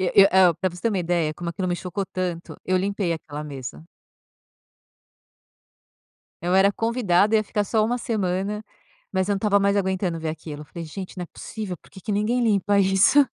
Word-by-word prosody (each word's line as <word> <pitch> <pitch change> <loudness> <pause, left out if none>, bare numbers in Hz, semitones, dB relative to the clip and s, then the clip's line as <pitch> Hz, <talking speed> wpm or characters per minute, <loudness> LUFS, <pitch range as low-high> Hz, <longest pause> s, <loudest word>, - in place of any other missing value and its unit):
Eh 195 +2 +6
eh 185 -3 +6
pra 185 - +2
você 175 - -11
ter 230 - +3
uma 200 -4 0
ideia 170 -3 0
como 170 +1 -4
aquilo 185 +2 -3
me 175 - +1
chocou 185 +2 -3
tanto, 175 -2 -4
eu 185 0 +2
limpei 195 -2 0
aquela 150 -2 -6
mesa. 125 - -7 2.6
Eu 180 +2 +1
era 200 +1 +5
convidada 220 -3 +2
ia 215 - +2
ficar 210 0 -1
só 215 +1 +1
1 240 +2 0
semana, 210 -2 -2 0.5
mas 190 +1 0
eu 205 - +2
não - - -1
estava 200 -1 +3
mais 200 0 +2
aguentando 190 -3 0
ver 160 0 -3
aquilo, 155 -1 -6
eu - - -11
falei: 165 +4 -8
"Gente, 185 +5 -7
não 180 - -4
é - - -5
possível 205 -2 -6
por - - -22
que 190 - -13
que 210 - -5
ninguém 215 +5 +1
limpa 205 -2 +3
isso?" 195 +9 +5
190 Hz, 195 wpm, -24 LUFS, 175-205 Hz, 2.6 s, Eh